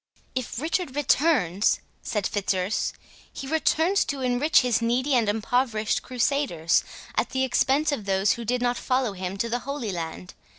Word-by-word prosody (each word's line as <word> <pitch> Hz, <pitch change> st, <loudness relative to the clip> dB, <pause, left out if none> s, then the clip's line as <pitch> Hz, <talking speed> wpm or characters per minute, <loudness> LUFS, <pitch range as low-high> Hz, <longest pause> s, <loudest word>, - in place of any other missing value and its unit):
"If 255 Hz, -2 st, -3 dB
Richard 320 Hz, -1 st, -2 dB
returns," 270 Hz, -, +2 dB, 0.2 s
said 210 Hz, -3 st, -2 dB
Fitzurse, 190 Hz, -1 st, 0 dB, 0.4 s
"he -, -, -7 dB
returns 320 Hz, +5 st, +2 dB
to 280 Hz, -2 st, -3 dB
enrich 255 Hz, +4 st, +3 dB
his 245 Hz, -3 st, +1 dB
needy 250 Hz, +5 st, +1 dB
and 235 Hz, -4 st, +3 dB
impoverished 220 Hz, 0 st, 0 dB
crusaders 250 Hz, -, +1 dB, 0.3 s
at -, -, 0 dB
the 265 Hz, 0 st, 0 dB
expense 270 Hz, +4 st, +2 dB
of 230 Hz, -8 st, -3 dB
those 195 Hz, 0 st, +2 dB
who 235 Hz, -, -2 dB
did 245 Hz, +2 st, -1 dB
not 245 Hz, 0 st, +1 dB
follow 255 Hz, -4 st, 0 dB
him 185 Hz, +1 st, -5 dB
to 230 Hz, -, -1 dB
the 240 Hz, +1 st, -1 dB
Holy 270 Hz, -5 st, -4 dB
Land. 170 Hz, +1 st, -6 dB
245 Hz, 160 wpm, -25 LUFS, 205-275 Hz, 0.4 s, enrich